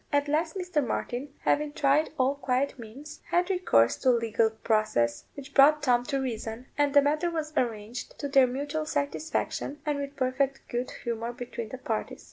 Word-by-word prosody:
At 285 0 +2
last 315 +3 0
Mr. 360 -5 0
Martin, 255 +2 -3
having 295 0 +1
tried 290 +2 +2
all 260 0 +3
quiet 265 -1 -1
means, 250 +7 -10
had 355 +2 +2
recourse 115 - +3
to 260 - +2
a 245 - +5
legal 230 -1 +2
process, 215 - 0
which 280 0 -10
brought 295 +2 +6
Tom 245 -3 +3
to 275 -1 -1
reason, 230 -2 -4
and 290 -1 +1
the 285 - +8
matter 305 +4 +1
was 315 -2 -4
arranged 230 -1 -3
to 285 - -3
their 270 -2 +5
mutual 290 +5 -3
satisfaction, 290 0 -2
and 295 -1 0
with 280 0 -5
perfect 270 +1 0
good 240 +1 -2
humour 235 0 -3
between 235 -2 -6
the 260 - -6
parties. 225 -3 -3
275 Hz, 180 wpm, -28 LUFS, 240-295 Hz, -, the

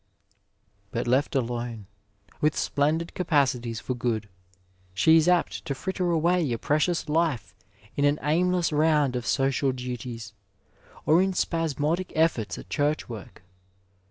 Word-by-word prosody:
But 115 - -2
left 130 +4 +1
alone, 120 -4 -2 0.6
with 150 0 +2
splendid 155 +4 0
capacities 130 -9 0
for 130 - -3
good, 115 -3 -2 0.7
she 160 +11 +5
is 160 +1 +3
apt 180 -1 +2
to 140 -4 -2
fritter 180 +5 -2
away 170 -2 +2
a 115 - 0
precious 155 +7 0
life 150 - 0 0.4
in 140 - 0
an 145 +1 +3
aimless 175 +3 +2
round 150 -3 +3
of 120 -1 -3
social 135 0 +1
duties, 125 -3 -6 0.7
or 160 +3 +5
in 190 0 +1
spasmodic 165 0 -1
efforts 140 -11 +1
at - - -10
Church 150 +1 0
work. 110 -5 -10
145 Hz, 130 wpm, -26 LUFS, 120-165 Hz, 0.7 s, she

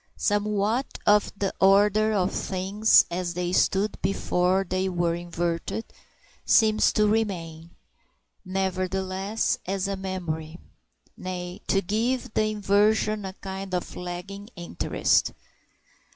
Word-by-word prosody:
Somewhat 210 +4 0
of 210 0 +4
the 195 -1 -1
order 205 +2 +5
of 195 -3 +1
things 195 +4 +3
as 175 0 -3
they 180 0 -2
stood 195 +2 +1
before 185 0 +1
they 185 +1 -1
were 175 -2 0
inverted 170 +4 -3 0.6
seems 215 -1 +4
to 215 - +3
remain, 175 -7 -1 0.7
nevertheless, 190 +2 -1
as 195 0 -1
a 200 - -2
memory; 170 -4 -5 0.6
nay, 180 -1 -6
to 195 0 +2
give 225 +5 -1
the 215 - +2
inversion 210 0 +1
a 190 - -5
kind 190 -1 -6
of 180 - -4
lagging 180 +4 -7
interest. 175 - 0
190 Hz, 110 wpm, -26 LUFS, 180-210 Hz, 0.7 s, order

